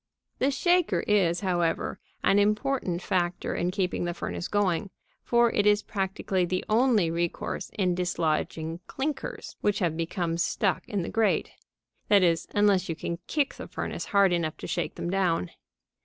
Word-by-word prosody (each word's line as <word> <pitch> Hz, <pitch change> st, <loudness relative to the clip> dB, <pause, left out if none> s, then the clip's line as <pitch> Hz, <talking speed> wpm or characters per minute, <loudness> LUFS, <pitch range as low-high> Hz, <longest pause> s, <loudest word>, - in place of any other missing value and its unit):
The 270 Hz, -, +3 dB
shaker 340 Hz, -, +2 dB
is, 180 Hz, -5 st, +2 dB
however, 175 Hz, -4 st, 0 dB, 0.2 s
an 200 Hz, -, +4 dB
important 210 Hz, -3 st, 0 dB
factor 180 Hz, -2 st, -1 dB
in 175 Hz, -, 0 dB
keeping 180 Hz, -1 st, -1 dB
the 175 Hz, 0 st, -2 dB
furnace 175 Hz, -, -4 dB
going, 200 Hz, -1 st, 0 dB, 0.3 s
for 235 Hz, -1 st, +3 dB
it 205 Hz, -, +2 dB
is 210 Hz, 0 st, +4 dB
practically 190 Hz, -2 st, -1 dB
the 185 Hz, +1 st, -1 dB
only 220 Hz, -6 st, +3 dB
recourse 170 Hz, 0 st, -2 dB
in 185 Hz, -3 st, +2 dB
dislodging 165 Hz, -2 st, -1 dB
clinkers 275 Hz, 0 st, -4 dB
which 205 Hz, 0 st, +1 dB
have 170 Hz, -5 st, 0 dB
become 165 Hz, 0 st, -2 dB
stuck 195 Hz, +2 st, 0 dB
in 205 Hz, -6 st, -1 dB
the -, -, -4 dB
grate 225 Hz, -1 st, +1 dB, 0.6 s
that 200 Hz, -2 st, +5 dB
is, 165 Hz, -2 st, +2 dB
unless 200 Hz, -3 st, +3 dB
you 165 Hz, -, -1 dB
can 170 Hz, +1 st, -4 dB
kick 290 Hz, -3 st, 0 dB
the -, -, -8 dB
furnace -, -, -4 dB
hard 200 Hz, -3 st, +4 dB
enough 165 Hz, -3 st, -1 dB
to -, -, -8 dB
shake 175 Hz, -, -2 dB
them 170 Hz, -, -3 dB
down. 175 Hz, -, +1 dB
185 Hz, 160 wpm, -27 LUFS, 170-210 Hz, 0.6 s, that